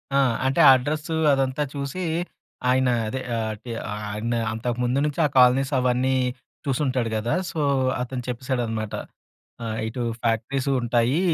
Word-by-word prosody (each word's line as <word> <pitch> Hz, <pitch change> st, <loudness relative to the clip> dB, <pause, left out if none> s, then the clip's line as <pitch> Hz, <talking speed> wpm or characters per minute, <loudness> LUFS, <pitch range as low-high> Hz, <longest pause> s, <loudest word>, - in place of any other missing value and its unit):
ఆ! -, -, +5 dB, 0.3 s
అంటే, 135 Hz, -, 0 dB
అడ్రస్సూ 150 Hz, +5 st, -1 dB, 0.2 s
అదంతా 135 Hz, +1 st, +1 dB
చూసీ, 140 Hz, +6 st, -4 dB, 0.7 s
ఆయనా 130 Hz, 0 st, +3 dB, 0.2 s
అదే 130 Hz, +4 st, -3 dB, 0.2 s
ఆహ్, 110 Hz, -1 st, -2 dB
టె 120 Hz, -, -7 dB, 0.4 s
ఆయనా 115 Hz, +3 st, -2 dB
అంతకు 115 Hz, +2 st, -3 dB
ముందు 125 Hz, +3 st, +1 dB
నుంచే 150 Hz, +2 st, -2 dB
ఆ -, -, +4 dB
కాలనీసవన్నీ 130 Hz, 0 st, +3 dB, 0.5 s
చూసుంటాడు 130 Hz, -3 st, 0 dB
గదా! 110 Hz, +4 st, -1 dB, 0.2 s
సో, 160 Hz, -, -4 dB, 0.4 s
అతను 125 Hz, 0 st, -3 dB
చెప్పేశాడనమాట. 120 Hz, -4 st, -2 dB, 0.7 s
ఆహ్, 110 Hz, -1 st, -3 dB
ఇటూ 115 Hz, +3 st, -4 dB, 0.2 s
ఫ్యాక్టరీసూ 125 Hz, +4 st, 0 dB
ఉంటాయీ. 120 Hz, +5 st, +2 dB
125 Hz, 125 wpm, -24 LUFS, 115-135 Hz, 0.7 s, ఆ